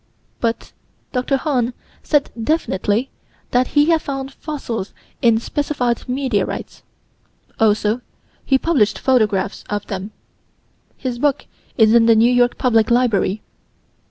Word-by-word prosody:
But 230 -1 -2 0.4
Dr. 255 +2 0
Hahn 255 -4 -1 0.3
said 295 -2 +1
definitely 230 - -1 0.4
that 250 0 +2
he 295 +3 +5
had 325 -1 +3
found 270 -1 -5
fossils 255 -11 -5 0.3
in 230 -2 +4
specified 250 -1 -2
meteorites: 260 0 -2 0.8
also 215 +1 +2 0.4
he 270 - +3
published 265 -9 +1
photographs 210 -7 +1
of 205 0 -3
them. 195 0 -5 0.9
His 250 -2 -4
book 285 0 +1 0.3
is 220 -2 +5
in 230 -1 +5
the 230 - +6
New 230 +3 +4
York 245 0 +2
Public 225 -4 +2
Library. 220 -4 +1
245 Hz, 120 wpm, -19 LUFS, 220-270 Hz, 0.9 s, the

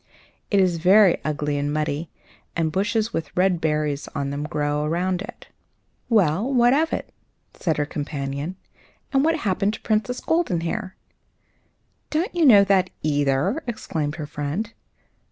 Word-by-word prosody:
It 200 - +3
is 180 -3 +3
very 185 +2 +5
ugly 150 -1 -1
and 145 +1 -1
muddy, 155 +1 -2 0.5
and 160 -2 0
bushes 210 +5 0
with 160 - -3
red 180 -2 +2
berries 150 -2 -1
on 140 0 -2
them 145 +1 -3
grow 150 0 -1
around 180 +4 0
it." 205 - -10 0.6
"Well, 205 - +2
what 245 -1 +4
of 315 +3 +2
that?" - - -4 0.4
said 160 -4 -1
her 145 - +1
companion; 145 +2 -4 0.6
"and 270 0 +4
what 325 +1 +3
happened 205 - 0
to - - -11
the - - -35
Princess 220 +3 0
Goldenhair?" 190 - -1 1.1
"Don't 335 +8 -1
you 340 -4 +3
know 205 -5 +8
that, 195 -2 +2
either?" 145 - +1
exclaimed 155 -10 -3
her 155 - -5
friend. 150 +10 -4
175 Hz, 150 wpm, -23 LUFS, 150-215 Hz, 1.1 s, know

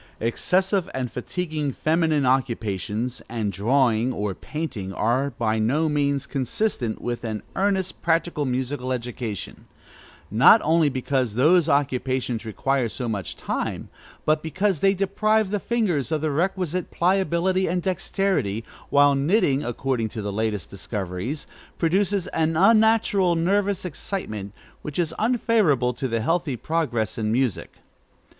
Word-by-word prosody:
Excessive 185 - +1
and 125 -3 -2
fatiguing 155 +1 -3
feminine 155 -3 +1
occupations, 115 -2 -1
and 110 -3 -2
drawing, 115 +3 +2
or 105 -4 -2
painting, 120 - -5
are 125 +8 +1
by 110 -4 -1
no 140 +9 +2
means 140 -2 0
consistent 130 - -2
with 120 0 -4
an 110 -2 -4
earnest, 190 -1 0
practical 165 -2 +1
musical 130 0 -2
education; 120 -4 -5 0.6
not - - +7
only 160 -1 +3
because 130 -3 -1
both - - -7
those 165 +4 +4
occupations 130 -4 0
require 125 +3 0
so 125 +2 -4
much 100 -7 -3
time, - - -3 0.4
but 155 0 +2
because 190 +2 0
they 195 +4 +3
deprive 205 +2 +1
the 205 - 0
fingers 185 - 0
of 155 -2 0
the 155 -1 0
requisite 180 +2 -1
pliability 185 +1 +1
and 180 +1 -1
dexterity, 185 - -1 0.2
while 145 0 +5
knitting, 140 -1 +2
according 120 -1 -1
to 110 -1 -6
the 100 -1 -3
latest 105 -2 -2
discoveries, 100 - -4 0.3
produces 190 +3 +1
an 160 0 0
unnatural 205 -2 +4
nervous 195 +3 +1
excitement, 125 - -5 0.3
which 150 - -6
is 165 -2 0
unfavorable 215 - +2
to 130 +1 -3
healthy 165 +3 0
progress 120 - -1
in 110 -1 0
music. 125 -3 -1
140 Hz, 130 wpm, -24 LUFS, 120-180 Hz, 0.6 s, not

